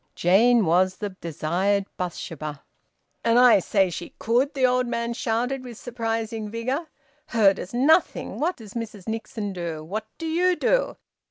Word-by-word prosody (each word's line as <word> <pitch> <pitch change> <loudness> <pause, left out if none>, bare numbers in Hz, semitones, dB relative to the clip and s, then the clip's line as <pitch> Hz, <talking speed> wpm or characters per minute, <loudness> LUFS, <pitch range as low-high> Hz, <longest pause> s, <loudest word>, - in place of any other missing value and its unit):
Jane 220 +5 +4
was 185 +3 +3
the 210 -1 -4
desired 185 +3 -1
Bathsheba. 155 -4 -5 0.6
"And 230 0 +3
I 245 -4 +7
say 190 0 +1
she 175 - -7
could!" 255 +6 +1
the 265 -2 +3
old 250 0 +2
man 235 0 -2
shouted 245 +3 -1
with 240 -3 -9
surprising 225 -2 -3
vigour. 255 +9 -3 0.4
"Her 210 -4 +4
does 190 - -8
nothing! 280 +9 +2
What 340 +4 0
does 215 -4 -12
Mrs 220 -4 -6
Nixon 220 -2 -4
do? 170 -4 -5
What 210 +7 -5
do 330 - -6
you 355 +3 +2
do? - - +1
225 Hz, 155 wpm, -24 LUFS, 190-245 Hz, 0.6 s, I